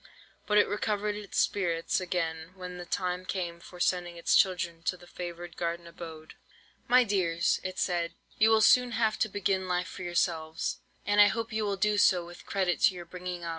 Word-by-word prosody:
But 210 - +3
it 210 - +6
recovered 210 0 -1
its 210 -1 -7
spirits 170 -3 +1
again 165 -2 -3
when 180 -1 -7
the 175 - -8
time 180 -1 -2
came 175 -3 -4
for 180 +1 -13
sending 175 -1 0
its 170 - +2
children 175 -3 +2
to 180 - 0
the 175 - -15
favoured 175 -1 -7
garden 170 0 -3
abode. 165 -2 -10 0.5
"'My 250 0 +6
dears,' 180 -6 +1
it 185 0 -5
said, 175 -2 -1 0.2
'you 220 +1 +6
will 220 -1 +5
soon 250 +2 +5
have 220 -2 +1
to 220 - +1
begin 190 -1 -1
life 180 0 0
for - - -9
yourselves, 165 -2 -1 0.3
and 205 0 +5
I 205 - +9
hope 225 +2 -2
you 215 -1 0
will 200 -1 -1
do 210 +1 +2
so 180 -3 +4
with 175 0 -13
credit 185 -3 0
to 190 - +5
your 175 -1 -7
bringing 180 -1 -6
up. 170 - -4
180 Hz, 200 wpm, -29 LUFS, 170-205 Hz, 0.5 s, I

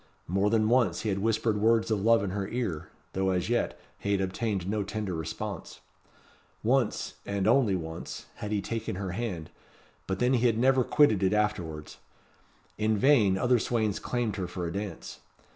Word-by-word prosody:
More 95 +4 +2
than 110 -1 +2
once 115 -7 +2
he 110 - -2
had 100 -1 0
whispered 110 0 +1
words 115 +1 +3
of 105 -2 +1
love 115 0 +4
in 100 - -2
her 100 0 -2
ear; 115 -11 -3 0.2
though, 95 0 +1
as 90 +2 0
yet, 120 0 0 0.2
he 100 - -1
had 100 - +2
obtained 95 0 -2
no 105 +1 0
tender 100 -1 -3
response. 85 +4 -5 0.8
Once 120 0 +1
and 100 -1 -2
once - - +2
only 95 -10 0
had 105 - -4
he 105 -1 +1
taken 115 -1 -3
her 95 -1 -4
hand; 90 -6 -4 0.6
but 95 - -1
then 125 +5 +2
he 125 -1 +3
had 115 -2 +1
never 130 +2 +4
quitted 120 -8 +4
it 95 +1 +2
afterwards. 90 -8 -2 0.8
In 110 0 +2
vain 105 -6 +4
other 125 +4 +3
swains 110 -3 0
claimed 120 -5 -2
her 90 -2 -2
for 90 -1 -4
a 85 - -4
dance. 100 +1 -6
105 Hz, 180 wpm, -28 LUFS, 95-115 Hz, 0.8 s, love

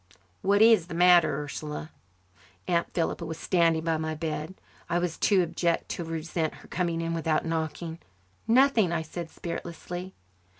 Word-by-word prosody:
"What 200 +2 +4
is 220 -7 +6
the 165 - -6
matter, 175 -4 +5
Ursula?" 150 +2 -6 0.8
Aunt 170 -2 +1
Philippa 170 0 -1
was 160 -1 -5
standing 165 -2 +2
by 165 -1 +1
my 160 0 -3
bed. 155 +2 -4 0.3
I 170 - +1
was 175 -2 -1
too 195 -3 +3
abject 170 0 -1
to 175 - -3
resent 160 0 -3
her - - -15
coming 170 -2 -1
in 165 0 -2
without 160 -1 0
knocking. 165 0 -3 0.5
"Nothing," 235 -6 +4
I 165 -1 -1
said 165 +1 -6
spiritlessly. 175 +2 -6
165 Hz, 155 wpm, -27 LUFS, 160-180 Hz, 0.8 s, is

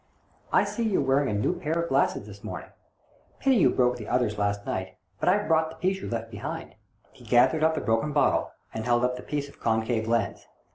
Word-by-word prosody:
I - - +5
see 235 - -4
you're 195 - +2
wearing 135 +1 +2
a 105 - 0
new 105 - +1
pair 160 -3 -2
of 170 0 -2
glasses - - +1
this - - -12
morning; - - -7 0.7
pity 270 -2 +3
you 195 - +5
broke 125 -1 +2
the 110 - -8
others 120 -4 0
last 100 0 -1
night, 95 0 -4 0.2
but - - +2
I've 205 +3 +2
brought 160 -1 +3
the 160 - -10
piece 190 +4 -1
you - - -5
left 115 -1 -4
behind." 105 -2 -6 0.4
He - - -17
gathered 130 +6 +4
up 160 0 +3
the - - -2
broken 115 +7 +1
bottle, 145 -1 +2 0.2
and 110 - -4
held 120 0 +3
up 125 0 0
the 125 - -7
piece 145 +1 -3
of 140 - -17
concave 110 0 0
lens. 115 -3 -1
125 Hz, 225 wpm, -27 LUFS, 110-160 Hz, 0.7 s, I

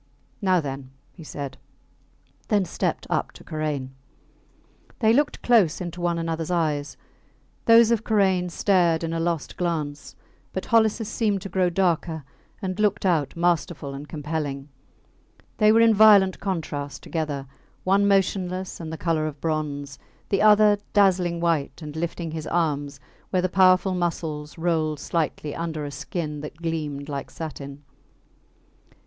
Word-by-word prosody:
Now 185 -2 +3
then, 135 -3 -5 0.2
he 170 - -13
said 140 -3 -7 0.9
then 205 -3 +2
stepped - - -2
up - - 0
to - - -14
Karain. 150 -4 -3 1.1
They 220 -1 +4
looked 290 +4 +1
close 215 -10 +4
into 175 -1 -6
one 175 -1 0
anothers 165 -1 -3
eyes. 155 -4 -1 0.7
Those 230 0 +7
of 230 -2 +1
Karain 190 -5 +2
stared 170 -3 +2
in 165 0 -2
a 165 - -1
lost 165 -2 -2
glance, 155 -5 -3 0.4
but 190 - -3
Holliss 225 -1 +2
seemed 205 -5 0
to 195 - -6
grow 185 0 +2
darker 170 -3 0 0.4
and 185 +1 -3
looked 210 -1 +1
out 160 -7 +1
masterful 170 -4 0
and 140 +2 -8
compelling. 150 -2 -4 0.9
They 215 0 +5
were 225 +1 +5
in 230 -1 +6
violent 205 -3 +6
contrast 155 -7 -4
together 150 -4 -3 0.4
one 200 +2 +3
motionless 190 -1 0
and 160 -2 -6
the 160 - -5
colour 160 -2 0
of 145 -2 -7
bronze, 145 -3 -3 0.3
the 195 - +1
other 210 -1 +6
dazzling 185 -4 +3
white 165 -5 0
and 150 0 -7
lifting 165 0 -3
his 160 -1 -5
arms, 145 -4 -1 0.3
where 185 -1 +1
the 185 - +1
powerful 185 0 +4
muscles 160 -4 -3
rolled 160 -3 0
slightly 155 -2 -2
under 160 -3 -3
a 145 - -5
skin 150 0 -4
that 150 0 -8
gleamed 155 -4 -3
like 140 -2 -5
satin. 145 -3 -8
170 Hz, 145 wpm, -24 LUFS, 150-190 Hz, 1.1 s, Those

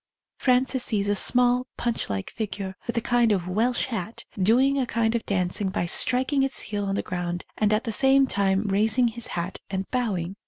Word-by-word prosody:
Frances 255 0 +2
sees 205 -3 0
a - - +3
small 245 +4 +4
Punch 235 -1 -2
like 95 -1 -4
figure, 200 -3 -5
with 235 - -3
a - - +2
kind 240 -1 +2
of 185 -4 0
Welsh 225 +7 0
hat, 225 -3 -6 0.2
doing 260 +8 +3
a 255 - -1
kind 230 -1 0
of 235 - -1
dancing 190 0 0
by 180 - -2
striking 260 - +1
its 270 0 -1
heel 205 -1 -3
on 195 0 -2
the - - -2
ground 175 -1 -4
and 215 -1 +1
at 215 +2 +1
the 230 - -3
same 270 +4 +4
time 200 -4 +1
raising 220 +4 +2
his 235 0 -7
hat 175 +2 -4
and 190 0 -3
bowing. 200 -7 -2
220 Hz, 200 wpm, -25 LUFS, 195-245 Hz, 0.2 s, small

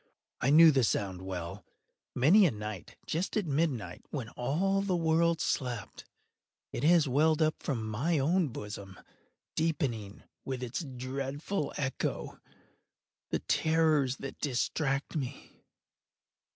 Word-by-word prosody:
I 130 - +1
knew 160 +2 +9
the 135 -3 +3
sound 95 -4 0
well. 90 -3 -5 0.5
Many 180 +10 +6
a - - +3
night, 105 -3 -7
just 175 +7 -2
at 210 - 0
midnight, 145 -6 -1
when 130 -7 -4
all 185 +12 0
the 195 -2 0
world 165 0 +2
slept, 120 -10 -3 0.7
it - - -4
has 165 -1 +5
welled 155 +4 +3
up 155 -1 +1
from 115 -6 -2
my 140 +10 0
own 165 +5 +2
bosom, 105 -5 -8 0.5
deepening, 130 -11 -2 0.2
with 130 -1 -4
its 125 +8 -3
dreadful 135 +5 -3
echo, 135 -2 -3 0.9
the - - -1
terrors 155 -5 +2
that 135 0 -8
distracted 135 +2 -1
me. 130 -3 -8
140 Hz, 125 wpm, -31 LUFS, 120-160 Hz, 0.9 s, knew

